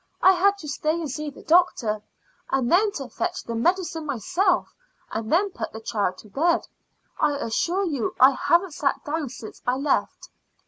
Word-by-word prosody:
I 380 - +9
had 395 +2 +3
to 315 - -9
stay 305 +2 -1
and 310 -5 -4
see 300 +2 -4
the 280 - -13
doctor, 295 -11 +3 0.5
and 265 -3 0
then 405 +4 +4
to 275 -8 -5
fetch - - -3
the 235 - -5
medicine 335 +6 0
myself, 345 - 0 0.4
and 220 0 -4
then 390 +5 +3
put 230 -10 -5
the 220 - -6
child 205 -4 -1
to - - -15
bed. 330 - +2 0.6
I 300 -1 +3
assure 345 - 0
you 285 -10 -2
I 260 +2 +8
haven't 340 +5 +2
sat 280 -2 -1
down 295 -2 -2
since 230 -3 -10
I 250 - +3
left." 275 +1 -1
300 Hz, 180 wpm, -24 LUFS, 245-350 Hz, 0.6 s, I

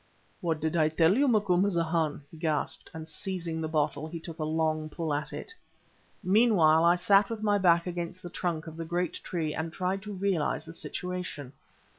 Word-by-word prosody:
"What 165 -3 -1
did 160 +1 -1
I 155 -2 +4
tell 165 +4 +4
you, 280 +3 +3
Macumazahn?" 175 - +1
he 160 - -12
gasped, 155 -2 -2
and 160 0 -8
seizing 165 -1 -4
the 160 - -1
bottle, 150 -1 0
he 165 +1 -6
took 165 0 -9
a - - -1
long 155 0 0
pull 160 -1 -3
at 150 +1 -1
it. 150 - -5 0.7
Meanwhile 185 -6 +5
I 170 +1 +6
sat 195 +3 +4
with 225 -2 -4
my 205 -1 +3
back 170 -3 +4
against 175 0 -5
the 175 - -6
trunk 170 -4 -2
of 160 0 -9
the 165 - -3
great 175 +1 -1
tree 160 -4 -2
and 160 +1 -3
tried 185 +3 -2
to 210 0 -7
realize 190 -5 0
the 165 - -9
situation. 180 -7 -5
170 Hz, 190 wpm, -29 LUFS, 155-185 Hz, 0.7 s, I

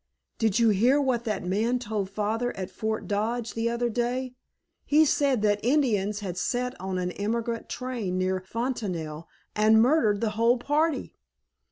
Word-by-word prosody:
"Did 220 -3 +2
you 230 -1 +4
hear 240 +8 +4
what 255 -4 0
that 210 -4 -2
man 220 +7 +1
told 215 -5 -3
Father 215 +4 -2
at 190 0 -5
Fort 220 +2 -3
Dodge 225 +3 -1
the 230 +1 0
other 235 +1 0
day? 245 +2 -2 0.5
He 310 +2 +4
said 275 -6 +2
that 205 -1 +2
Indians 220 -6 +1
had 180 -3 -5
set 250 +7 -1
on 190 0 -3
an 180 0 -2
emigrant 230 +4 -3
train 240 -8 -3
near 185 0 0
Fontanelle 185 -9 -4 0.3
and 215 +1 +5
murdered 230 -5 +3
the 220 -1 0
whole 230 +3 +3
party." 295 +5 0
225 Hz, 160 wpm, -27 LUFS, 205-245 Hz, 0.5 s, and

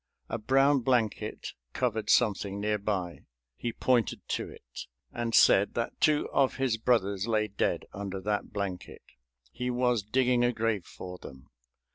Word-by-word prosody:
A 115 - -3
brown 135 +5 +3
blanket 120 -4 -1 0.2
covered 110 -4 -1
something 100 -3 +2
near 105 0 0
by. 95 -4 -3 0.3
He 120 - -3
pointed 120 -1 0
to - - -2
it - - -11 0.3
and 115 -2 -1
said 100 +1 +5
that 115 - -3
two 150 -1 +3
of 135 -2 +2
his 130 -4 0
brothers 105 -4 +1
lay 110 -2 +1
dead 100 - -1
under 100 -1 -5
that 105 +1 -2
blanket. 95 -3 -5 0.5
He 125 - -3
was 125 -2 +1
digging 125 +3 +2
a 120 0 +2
grave 110 -5 -1
for 90 0 -9
them. 65 0 -13
110 Hz, 150 wpm, -29 LUFS, 100-125 Hz, 0.5 s, said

